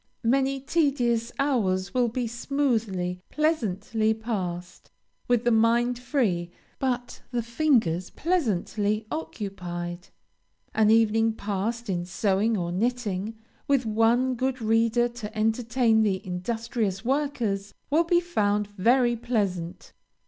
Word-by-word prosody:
Many 270 +3 +2
tedious 260 -6 +1
hours 195 -10 0
will 250 -1 +3
be 240 +2 -2
smoothly, 225 -8 -1
pleasantly 220 - 0
passed, 185 -6 -5 0.4
with 245 -1 +2
the 240 - +3
mind 235 +2 +3
free, 225 - 0 0.3
but 245 -2 -2
the 240 -2 -1
fingers 230 - +1
pleasantly 215 - 0
occupied. 180 - -5 0.7
An 220 -1 +4
evening 225 0 +4
passed 220 +3 -3
in 175 -3 -1
sewing 200 +4 +1
or 175 -2 -2
knitting, 220 0 -2 0.3
with 275 -3 +2
one 230 +4 +2
good 260 +1 -1
reader 230 +1 +2
to 225 -2 -8
entertain 225 +1 +2
the 195 -3 0
industrious 215 +2 -2
workers, 240 -8 -1 0.2
will 320 +3 +4
be 345 0 +4
found 210 -12 0
very 240 +5 +3
pleasant. 195 -8 -2
225 Hz, 110 wpm, -26 LUFS, 200-245 Hz, 0.7 s, An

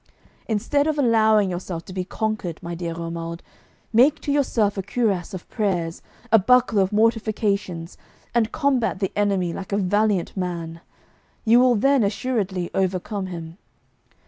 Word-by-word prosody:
Instead 285 +7 +1
of 310 -1 0
allowing 220 -5 +4
yourself 175 -1 -5
to 185 - -9
be 185 -1 -2
conquered, 215 -4 -3
my 170 - -5
dear 170 -1 -4
Romuald, 170 0 -5 0.5
make 255 +7 +5
to 285 - -2
yourself 235 -8 +1
a 195 - -2
cuirass 200 -3 -1
of 180 - -9
prayers, 180 -6 -2 0.3
a 225 - +7
buckler 245 0 +4
of 190 - 0
mortifications, 210 -6 0 0.3
and 230 -2 +2
combat 275 -8 +1
the 195 -1 -2
enemy 195 -4 +1
like 195 - -7
a 200 - +1
valiant 205 -1 +1
man; 170 -3 -4 0.6
you 230 +2 +6
will 250 -1 +5
then 270 +5 +3
assuredly 200 -4 -1
overcome 190 +1 -1
him. 170 0 -8
200 Hz, 145 wpm, -23 LUFS, 180-225 Hz, 0.6 s, a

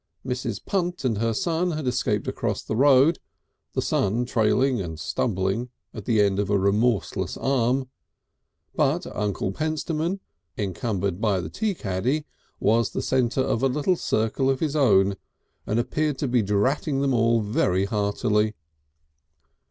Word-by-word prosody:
Mrs. 125 -4 -3
Punt 180 -5 -1
and 115 -5 +1
her 115 0 +1
son 170 - 0
had 155 -2 -3
escaped 115 -5 0
across - - -2
the 110 - -3
road, 140 +5 +5 0.5
the - - -1
son 110 +5 +1
trailing 125 +1 +2
and 80 -4 -6
stumbling 95 - -1 0.2
at 105 -4 -8
the 115 -3 +2
end 100 -1 +2
of 100 -1 -1
a 105 - +3
remorseless 100 +1 0
arm, 130 0 +1 0.9
but - - +1
Uncle 100 -2 -1
Pentstemon, 155 - -2 0.4
encumbered 100 -1 -2
by 105 -4 +2
the 80 -2 -5
tea 215 - -1
caddy, 125 - -1 0.3
was 115 +2 +2
the - - -3
centre 130 0 +1
of 120 -3 0
a 135 - +4
little 150 +7 +1
circle 120 -1 0
of 135 -1 +1
his 155 -2 -1
own, 100 -8 +4 0.5
and 110 - +1
appeared 145 +4 -1
to 140 - -1
be 125 -1 +2
dratting 130 +8 0
them 140 -1 +1
all 115 -1 +3
very 100 -2 +1
heartily. 105 +1 0
115 Hz, 150 wpm, -25 LUFS, 100-135 Hz, 0.9 s, road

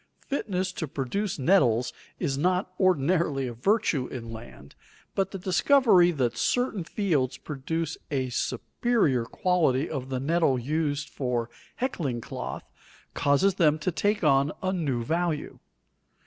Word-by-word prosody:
Fitness 190 -9 -1
to 165 -3 -4
produce 160 +10 -2
nettles 130 - +3 0.2
is 140 -6 -1
not 180 +5 0
ordinarily 165 -5 +2
a 120 - -4
virtue 145 - +1
in 115 -3 -7
land, 110 -10 -11 0.4
but 195 -1 0
the 195 - -6
discovery 190 0 +4
that 130 -8 0
certain 225 - 0
fields 160 - 0
produce 160 +2 -4
a 130 -4 -1
superior 130 - 0
quality 160 -4 +1
of 135 -4 -5
the 130 -1 -2
nettle 155 -1 +2
used 150 +3 -1
for 120 -3 -2 0.2
heckling 155 - -2
cloth, 65 - -6 0.5
causes 145 +8 +3
them 155 -5 +3
to 155 +4 -1
take 205 +4 0
on 140 -1 +4
a 185 0 0
new 140 -10 -1
value. 165 +2 -2
155 Hz, 135 wpm, -27 LUFS, 130-185 Hz, 0.5 s, discovery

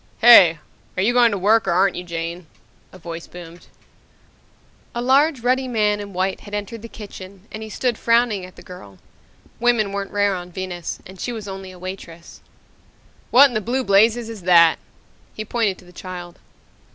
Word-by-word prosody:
"Hey! 200 -9 +8 0.4
Are 185 - +1
you 235 +4 +2
going 245 -1 +5
to 205 - -2
work 210 +3 +2
or - - +2
aren't 190 +2 +2
you, 180 - -5
Jane?" 170 0 -6 0.4
a - - -13
voice 170 -1 -8
boomed. 175 -1 -12 1.3
A - - -2
large 270 +3 +2
ruddy 255 +2 +1
man 210 -4 +1
in 205 -1 -7
white 190 +1 -2
had 205 0 -8
entered 205 +2 -6
the 230 - -8
kitchen 195 -3 -11
and 215 - -7
he 220 - -7
stood 240 +1 -2
frowning 230 -4 +2
at 185 0 -11
the - - -14
girl. 100 - -12 0.6
Women 235 -4 +2
weren't 200 0 -4
rare 205 -1 +1
on 180 -1 -7
Venus, 175 -2 -6
and 190 0 -13
she 245 - -3
was 220 -3 -7
only 190 -1 -7
a 185 - -12
waitress... 175 -2 -10 0.9
"What 275 +3 +7
in - - -9
the 215 - -1
blue 250 +5 -1
blazes 220 +3 +3
is 225 -3 -8
that!" 170 -2 +5 0.6
He 215 - -5
pointed 215 -4 -1
to - - -17
the 180 - -17
child. 175 -1 -9
200 Hz, 190 wpm, -21 LUFS, 180-230 Hz, 1.3 s, Hey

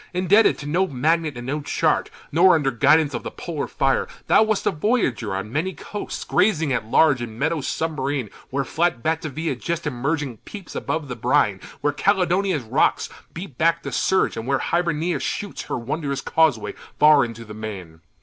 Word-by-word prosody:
Indebted 190 +5 +4
to 145 - -8
no 175 +6 +1
magnet 155 +1 0
and 120 - -7
no 145 +4 -2
chart, 145 - 0 0.2
Nor 175 +4 +6
under 145 -4 +1
guidance 145 +5 +3
of - - -3
the - - -5
polar 160 -5 -5
fire, 135 -2 +1 0.2
Thou - - +5
wast 220 -2 +1
a - - +3
voyager 170 - 0
on 100 +4 -5
many 175 +6 -1
coasts, 205 - -6
Grazing 165 -7 +2
at 110 -3 -2
large 140 +1 +4
in 115 -2 -6
meadows 150 +1 -1
submarine, 140 -7 -2 0.2
Where 140 +1 -1
flat 160 -4 0
Batavia 160 0 -2
just 170 -1 -4
emerging 140 -1 -2
peeps 195 - -10
Above 160 -3 -3
the 125 - -5
brine, 105 -3 +1 0.2
where 145 0 +1
Caledonia's 185 -2 +1
rocks 125 +7 +1 0.3
Beat 165 -7 -8
back 165 +1 +2
the - - -5
surge, 190 - +1
and 115 +1 -5
where 135 0 +2
Hibernia 170 +1 0
shoots 205 - -4
Her - - -3
wondrous 140 +2 -3
causeway 130 -12 +1 0.2
far 150 -1 +6
into 115 -1 -6
the 105 - -9
main. 95 -7 -8
150 Hz, 180 wpm, -23 LUFS, 125-170 Hz, 0.3 s, Nor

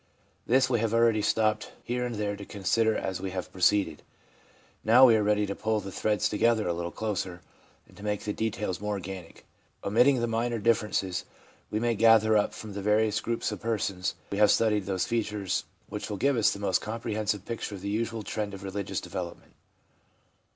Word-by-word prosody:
This 130 +2 +4
we 120 -3 +1
have 115 0 0
already 115 -2 +4
stopped 110 +1 +1
here 125 +1 -2
and 120 - -5
there 105 -1 -2
to 100 - -9
consider 110 +3 +1
as 95 -1 -3
we 95 - -3
have 90 0 -5
proceeded; 95 -3 +2 0.8
now 120 +4 +7
we 120 -3 +6
are 110 - +3
ready 105 0 +2
to 100 - -3
pull 110 +1 -1
the 100 -1 -7
threads 105 0 +1
together 110 -1 +2
a 85 - +1
little 85 0 -3
closer, 95 -4 -3 0.5
and - - -20
to - - -13
make 105 -1 -2
the 105 - -2
details 105 -4 -2
more 105 0 -1
organic. 95 -3 -8 0.4
Omitting 125 +6 +4
the 120 - +1
minor 115 +1 -1
differences, 105 -4 0 0.5
we 110 - -1
may 120 +1 +1
gather 110 0 +5
up 105 - +2
from 110 -2 -8
the 100 - -4
various 105 +1 +2
groups 115 -1 -2
of 105 - -6
persons 100 -5 -1 0.2
we 100 - -2
have 105 - +6
studied 105 -4 +2
those 95 -2 0
features 105 -4 -1 0.2
which - - -5
will 105 - -3
give 140 +6 +2
us 115 -3 +4
the - - -3
most 100 -3 +1
comprehensive 110 -2 -2
picture 115 -3 -4
of 95 - -9
the 100 - -5
usual 115 +1 -2
trend 105 0 -3
of 95 - -10
religious 95 0 -3
development. 90 -2 -7
105 Hz, 195 wpm, -28 LUFS, 100-115 Hz, 0.8 s, now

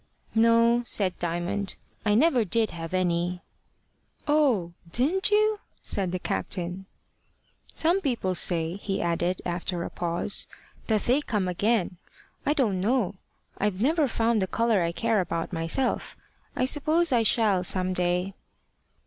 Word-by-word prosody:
"No," 230 +1 +4
said 190 -3 +2
Diamond. 175 +4 -2 0.3
"I 210 -1 +2
never 260 -1 +4
did 220 +2 0
have 165 -1 -7
any." 180 -1 -1 0.8
"Oh! 260 - +2 0.2
didn't 320 - +1
you?" 425 0 +2 0.2
said 190 -3 0
the 185 - -1
captain. 180 +1 -4 0.8
"Some 345 +4 +1
people 235 - -1
say," 170 0 +1
he 200 -1 -3
added, 175 +1 -1
after 175 0 -2
a - - -6
pause, 175 +3 -1 0.4
"that 215 -2 +1
they 260 +5 +2
come 210 -9 -1
again. 185 0 0 0.5
I 295 - +4
don't 215 -11 0
know. 225 -1 +1 0.5
I've 200 -2 -1
never 300 +5 +2
found 225 -2 +1
the 190 - 0
colour 230 -1 +1
I 170 0 0
care 225 +3 +1
about 170 0 -4
myself. 165 +11 -1 0.4
I 255 - +1
suppose 310 +4 +3
I 240 -2 +4
shall 210 -4 +2
some 185 0 +1
day." 180 +1 -1
200 Hz, 140 wpm, -26 LUFS, 180-240 Hz, 0.8 s, No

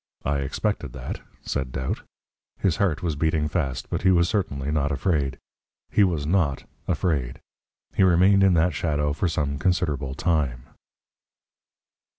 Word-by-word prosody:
"I 70 0 +1
expected 70 -1 -2
that," - - -6 0.2
said 65 -3 -2
Doubt. 65 +1 -3 0.6
His 90 -5 +1
heart 90 -4 +1
was 80 -4 0
beating 80 0 +1
fast, 70 -6 -2
but - - -1
he 95 - +4
was 85 -2 +4
certainly 75 -9 -1
not 75 -1 +1
afraid. 70 -3 0 0.5
He 105 - +4
was 85 -6 +1
NOT 80 -5 +1 0.2
afraid. 70 -9 -1 0.5
He - - +1
remained 95 +2 +5
in 95 -2 +5
that 85 +1 +3
shadow 75 -1 0
for 90 - 0
some 70 -3 -1
considerable 75 -8 0
time. 70 -8 0
75 Hz, 145 wpm, -25 LUFS, 70-90 Hz, 0.6 s, remained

